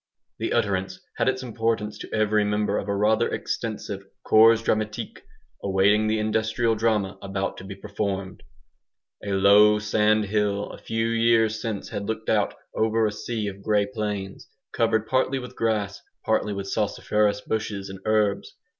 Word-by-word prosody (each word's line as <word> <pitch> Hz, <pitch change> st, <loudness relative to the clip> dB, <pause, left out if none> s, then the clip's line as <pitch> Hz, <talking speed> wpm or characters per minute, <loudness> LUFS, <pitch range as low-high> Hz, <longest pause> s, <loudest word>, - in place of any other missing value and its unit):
The -, -, -2 dB
utterance 95 Hz, -1 st, 0 dB, 0.2 s
had -, -, +2 dB
its 130 Hz, 0 st, -2 dB
importance 110 Hz, -3 st, -2 dB
to -, -, -9 dB
every 110 Hz, -1 st, +2 dB
member 105 Hz, 0 st, 0 dB
of 100 Hz, -, -6 dB
a 100 Hz, -, 0 dB
rather 110 Hz, +3 st, +2 dB
extensive 105 Hz, -3 st, -4 dB, 0.2 s
"CORPS 115 Hz, +1 st, +6 dB
DRAMATIQUE" 110 Hz, -1 st, -2 dB, 0.4 s
awaiting 100 Hz, +2 st, +3 dB
the 110 Hz, +1 st, +1 dB
industrial 110 Hz, +2 st, +1 dB
drama 105 Hz, -3 st, 0 dB
about 95 Hz, 0 st, -3 dB
to -, -, -9 dB
be 95 Hz, 0 st, -8 dB
performed. 100 Hz, -2 st, -4 dB, 0.8 s
A 100 Hz, -, -2 dB
low 100 Hz, +2 st, +6 dB
sand 105 Hz, 0 st, +2 dB
hill 105 Hz, 0 st, -1 dB
a -, -, -10 dB
few 115 Hz, 0 st, -1 dB
years 115 Hz, -1 st, +2 dB
since 110 Hz, -3 st, -4 dB
had 100 Hz, 0 st, -4 dB
looked 110 Hz, 0 st, -3 dB
out 105 Hz, -2 st, +1 dB, 0.2 s
over 110 Hz, 0 st, +1 dB
a 105 Hz, -, 0 dB
sea 110 Hz, +1 st, -4 dB
of 100 Hz, -1 st, -6 dB
grey 105 Hz, 0 st, +2 dB
plains, 105 Hz, -4 st, -5 dB, 0.3 s
covered 110 Hz, -1 st, +1 dB
partly 130 Hz, +2 st, +1 dB
with 125 Hz, -1 st, -8 dB
grass, 105 Hz, -3 st, -1 dB, 0.2 s
partly 105 Hz, -, +1 dB
with 100 Hz, -1 st, -4 dB
salsiferous 105 Hz, 0 st, 0 dB
bushes 105 Hz, -3 st, -3 dB
and 95 Hz, 0 st, -8 dB
herbs. 110 Hz, -2 st, 0 dB
105 Hz, 155 wpm, -25 LUFS, 100-110 Hz, 0.8 s, CORPS